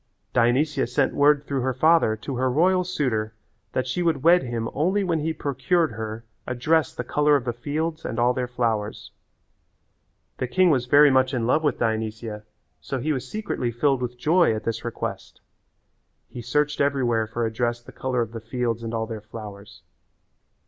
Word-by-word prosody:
Dionysia 135 Hz, +4 st, +2 dB
sent 130 Hz, +3 st, +1 dB
word 145 Hz, 0 st, +4 dB
through 140 Hz, -3 st, -2 dB
her 130 Hz, 0 st, -1 dB
father 155 Hz, -5 st, +4 dB
to 130 Hz, +4 st, -6 dB
her 130 Hz, +1 st, +1 dB
royal 180 Hz, +7 st, +3 dB
suitor 120 Hz, -11 st, -2 dB, 0.4 s
that 130 Hz, -, 0 dB
she 155 Hz, +8 st, -2 dB
would 160 Hz, -6 st, 0 dB
wed 175 Hz, +2 st, +6 dB
him 120 Hz, -2 st, -3 dB
only 185 Hz, +8 st, +1 dB
when 170 Hz, -4 st, 0 dB
he 160 Hz, +2 st, -1 dB
procured 145 Hz, +2 st, 0 dB
her 110 Hz, +1 st, -6 dB, 0.2 s
a 125 Hz, -, -2 dB
dress 160 Hz, +6 st, +2 dB
the 125 Hz, -, -3 dB
colour 150 Hz, +4 st, +2 dB
of 135 Hz, -3 st, 0 dB
the 120 Hz, -, -1 dB
fields 155 Hz, +6 st, -3 dB
and 115 Hz, -, -4 dB
all 120 Hz, +1 st, +3 dB
their 125 Hz, 0 st, -2 dB
flowers. 115 Hz, -4 st, -2 dB, 1.3 s
The 130 Hz, -, -1 dB
king 185 Hz, +6 st, +3 dB
was 125 Hz, -4 st, +1 dB
very 145 Hz, +2 st, +6 dB
much 130 Hz, 0 st, +2 dB
in 120 Hz, -2 st, -1 dB
love 150 Hz, +6 st, +2 dB
with 150 Hz, -, +1 dB
Dionysia, 110 Hz, -1 st, -3 dB, 0.3 s
so 135 Hz, -, -4 dB
he 150 Hz, +5 st, -1 dB
was 130 Hz, -1 st, -4 dB
secretly 210 Hz, -, -3 dB
filled 135 Hz, +2 st, +1 dB
with 125 Hz, 0 st, -4 dB
joy 160 Hz, -1 st, +3 dB
at 110 Hz, -, -5 dB
this 115 Hz, 0 st, -3 dB
request. 120 Hz, -, -5 dB, 0.9 s
He 120 Hz, -, -8 dB
searched 150 Hz, +5 st, 0 dB
everywhere 125 Hz, -6 st, +1 dB
for 115 Hz, +1 st, -2 dB
a 110 Hz, -, -3 dB
dress 120 Hz, 0 st, -1 dB
the -, -, -12 dB
colour 130 Hz, -2 st, -2 dB
of 115 Hz, -, -8 dB
the 115 Hz, -1 st, -7 dB
fields 115 Hz, 0 st, -2 dB
and 115 Hz, 0 st, -4 dB
all 110 Hz, 0 st, -1 dB
their 110 Hz, -2 st, -6 dB
flowers. 105 Hz, -2 st, -10 dB
125 Hz, 190 wpm, -24 LUFS, 115-150 Hz, 1.3 s, wed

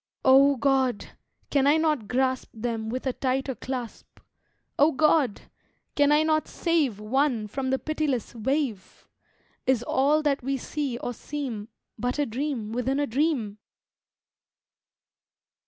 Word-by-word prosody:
O 275 Hz, +2 st, +6 dB
God! 265 Hz, -4 st, +1 dB, 0.4 s
can 280 Hz, -1 st, +3 dB
I 295 Hz, +2 st, +5 dB
not 305 Hz, -9 st, 0 dB
grasp 260 Hz, +1 st, 0 dB
Them 225 Hz, -1 st, -3 dB
with 255 Hz, +4 st, -4 dB
a 260 Hz, -, 0 dB
tighter 265 Hz, +1 st, -1 dB
clasp? 250 Hz, 0 st, -7 dB, 0.6 s
O 295 Hz, +3 st, +6 dB
God! 300 Hz, -5 st, +2 dB, 0.5 s
can 290 Hz, 0 st, +3 dB
I 300 Hz, +1 st, +5 dB
not 310 Hz, 0 st, +1 dB
save 310 Hz, -, 0 dB
One 240 Hz, +1 st, 0 dB
from 260 Hz, +5 st, -3 dB
the 265 Hz, -, +2 dB
pitiless 300 Hz, -5 st, -2 dB
wave? 240 Hz, -2 st, -3 dB, 0.6 s
Is 255 Hz, -3 st, +2 dB
all 285 Hz, +5 st, +2 dB
that 290 Hz, -2 st, +1 dB
we 270 Hz, +2 st, -1 dB
see 275 Hz, -1 st, -3 dB
or 245 Hz, -, -4 dB
seem 245 Hz, -6 st, -5 dB, 0.3 s
But 245 Hz, +2 st, -1 dB
a 290 Hz, -, +1 dB
dream 245 Hz, -3 st, -3 dB
within 250 Hz, +4 st, -1 dB
a 290 Hz, -, +2 dB
dream? 255 Hz, -6 st, -1 dB
265 Hz, 135 wpm, -26 LUFS, 240-290 Hz, 0.6 s, O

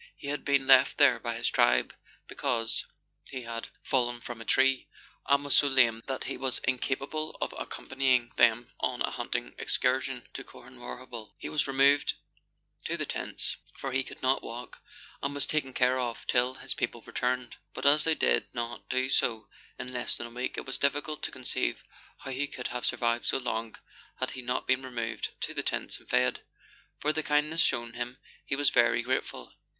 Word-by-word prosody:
He 140 Hz, -, -6 dB
had 145 Hz, -, -3 dB
been 140 Hz, -2 st, +2 dB
left 130 Hz, -1 st, +6 dB
there 135 Hz, -5 st, +6 dB
by 120 Hz, 0 st, -3 dB
his 115 Hz, +1 st, -1 dB
tribe, 60 Hz, 0 st, +3 dB, 0.3 s
because 115 Hz, -2 st, -1 dB, 0.4 s
he 130 Hz, -2 st, -5 dB
had 115 Hz, 0 st, -5 dB, 0.2 s
fallen 120 Hz, -2 st, +1 dB
from 120 Hz, -1 st, -7 dB
a -, -, -8 dB
tree, 130 Hz, +1 st, +3 dB, 0.4 s
and 140 Hz, +1 st, +3 dB
was 145 Hz, -, +4 dB
so 145 Hz, -, +6 dB
lame 120 Hz, -4 st, +4 dB
that 135 Hz, -1 st, -3 dB
he 135 Hz, -, -4 dB
was 130 Hz, -1 st, -1 dB
incapable 135 Hz, +5 st, -1 dB
of -, -, -2 dB
accompanying 130 Hz, -3 st, 0 dB
them 120 Hz, 0 st, +4 dB
on -, -, 0 dB
a -, -, 0 dB
hunting -, -, -3 dB
excursion 130 Hz, 0 st, 0 dB
to 135 Hz, -, -5 dB
Corhanwarrabtil. 120 Hz, -2 st, -9 dB
He -, -, -6 dB
was 150 Hz, -, +1 dB
removed 140 Hz, +1 st, +4 dB, 0.7 s
to -, -, -1 dB
the -, -, -2 dB
tents, -, -, -3 dB, 0.2 s
for 135 Hz, -, -4 dB
he 130 Hz, +1 st, +2 dB
could -, -, -10 dB
not 130 Hz, +1 st, +3 dB
walk, 120 Hz, +2 st, -8 dB, 0.4 s
and 140 Hz, +1 st, -2 dB
was 145 Hz, -, +3 dB
taken 150 Hz, -3 st, -1 dB
care 130 Hz, 0 st, +3 dB
of 120 Hz, -2 st, -3 dB
till 125 Hz, +1 st, +2 dB
his -, -, -3 dB
people -, -, -3 dB
returned; 125 Hz, 0 st, -2 dB, 0.2 s
but -, -, -5 dB
as 150 Hz, +2 st, +7 dB
they 160 Hz, -1 st, +3 dB
did -, -, +2 dB
not 120 Hz, 0 st, -4 dB
do 130 Hz, 0 st, +1 dB
so 115 Hz, -4 st, +1 dB, 0.3 s
in 125 Hz, 0 st, -5 dB
less 125 Hz, -1 st, 0 dB
than 120 Hz, -, -5 dB
a -, -, -8 dB
week, 125 Hz, +2 st, -3 dB
it -, -, -5 dB
is 135 Hz, -, -3 dB
difficult 145 Hz, +2 st, 0 dB
to -, -, -1 dB
conceive 125 Hz, -, -1 dB, 0.4 s
how 135 Hz, -, -6 dB
he 135 Hz, +2 st, -1 dB
could 125 Hz, -3 st, -5 dB
have 125 Hz, 0 st, -2 dB
survived 120 Hz, 0 st, 0 dB
so -, -, +3 dB
long 115 Hz, -3 st, -3 dB, 0.4 s
had -, -, -1 dB
he 130 Hz, -, -6 dB
not 125 Hz, 0 st, -2 dB
been 130 Hz, 0 st, +3 dB
removed 120 Hz, -3 st, -3 dB
to -, -, -2 dB
the -, -, -1 dB
tents -, -, -1 dB
and -, -, -19 dB
fed. 125 Hz, 0 st, +2 dB, 0.6 s
For 150 Hz, +1 st, +1 dB
the 155 Hz, -, 0 dB
kindness 150 Hz, +2 st, +2 dB
shown 120 Hz, 0 st, +1 dB
him 120 Hz, +1 st, -4 dB, 0.3 s
he 135 Hz, -, -2 dB
was 145 Hz, 0 st, +3 dB
very 120 Hz, -1 st, +4 dB
grateful. 130 Hz, +2 st, -2 dB
130 Hz, 190 wpm, -29 LUFS, 120-135 Hz, 0.7 s, as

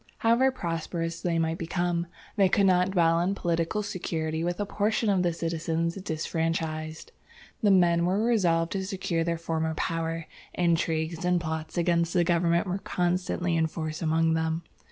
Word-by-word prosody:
"However 235 Hz, +4 st, +4 dB
prosperous 165 Hz, -4 st, -3 dB
they 170 Hz, -2 st, 0 dB
might 165 Hz, 0 st, 0 dB
become, 175 Hz, 0 st, -1 dB, 0.3 s
they 195 Hz, -3 st, +4 dB
could 200 Hz, +2 st, +3 dB
not 180 Hz, -1 st, +4 dB
dwell 170 Hz, -3 st, +3 dB
in 185 Hz, +3 st, 0 dB
political 170 Hz, +3 st, -1 dB
security 165 Hz, -5 st, -3 dB
with 175 Hz, +2 st, -2 dB
a 205 Hz, -, 0 dB
portion 210 Hz, +2 st, 0 dB
of 190 Hz, -2 st, +2 dB
the 175 Hz, -1 st, +2 dB
citizens 165 Hz, 0 st, -1 dB
disfranchised. 160 Hz, -2 st, -3 dB, 0.5 s
The 210 Hz, -, +4 dB
men 175 Hz, -3 st, +4 dB
were 195 Hz, +4 st, +1 dB
resolved 170 Hz, -8 st, +2 dB
to 195 Hz, -1 st, -2 dB
secure 185 Hz, -4 st, -1 dB
their 170 Hz, 0 st, -1 dB
former 160 Hz, -1 st, -2 dB
power. 165 Hz, 0 st, -2 dB, 0.3 s
Intrigues 165 Hz, -1 st, 0 dB
and 180 Hz, 0 st, +2 dB
plots 160 Hz, -1 st, -4 dB
against 170 Hz, -1 st, +1 dB
the 175 Hz, -, +4 dB
government 170 Hz, 0 st, +2 dB
were 185 Hz, +1 st, -2 dB
constantly 180 Hz, -1 st, -1 dB
in 160 Hz, -1 st, +2 dB
force 155 Hz, -1 st, -5 dB
among 160 Hz, 0 st, +2 dB
them. 160 Hz, +1 st, -1 dB
170 Hz, 160 wpm, -27 LUFS, 165-180 Hz, 0.5 s, However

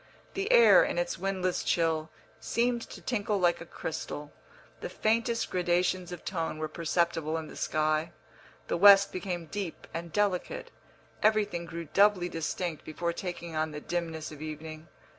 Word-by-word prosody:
The 395 Hz, +4 st, -1 dB
air, 480 Hz, -1 st, +8 dB
in -, -, -2 dB
its -, -, -1 dB
windless 185 Hz, -2 st, -1 dB
chill, 160 Hz, -2 st, +1 dB, 0.3 s
seemed 240 Hz, 0 st, 0 dB
to -, -, -10 dB
tinkle 210 Hz, -3 st, 0 dB
like 175 Hz, -2 st, +2 dB
a 165 Hz, -, -8 dB
crystal, 150 Hz, -3 st, -6 dB, 0.5 s
the -, -, -5 dB
faintest 230 Hz, +1 st, 0 dB
gradations 180 Hz, 0 st, +1 dB
of 175 Hz, -, -8 dB
tone 165 Hz, -4 st, -2 dB
were 155 Hz, 0 st, -2 dB
perceptible 165 Hz, 0 st, 0 dB
in 160 Hz, -1 st, -6 dB
the -, -, -11 dB
sky, 155 Hz, +1 st, 0 dB, 0.6 s
the -, -, 0 dB
west 200 Hz, +1 st, +8 dB
became 180 Hz, -2 st, -4 dB
deep 190 Hz, -1 st, -5 dB
and 170 Hz, 0 st, -5 dB
delicate, 200 Hz, -1 st, -1 dB, 0.5 s
everything 210 Hz, -5 st, +2 dB
grew 170 Hz, 0 st, -6 dB
doubly 195 Hz, +1 st, +3 dB
distinct 165 Hz, 0 st, -3 dB
before 170 Hz, +2 st, -3 dB
taking 170 Hz, -2 st, -6 dB
on 155 Hz, 0 st, 0 dB
the 150 Hz, -1 st, -6 dB
dimness 160 Hz, -1 st, -4 dB
of 150 Hz, -1 st, -10 dB
evening. 155 Hz, +1 st, -7 dB
175 Hz, 155 wpm, -29 LUFS, 160-200 Hz, 0.6 s, air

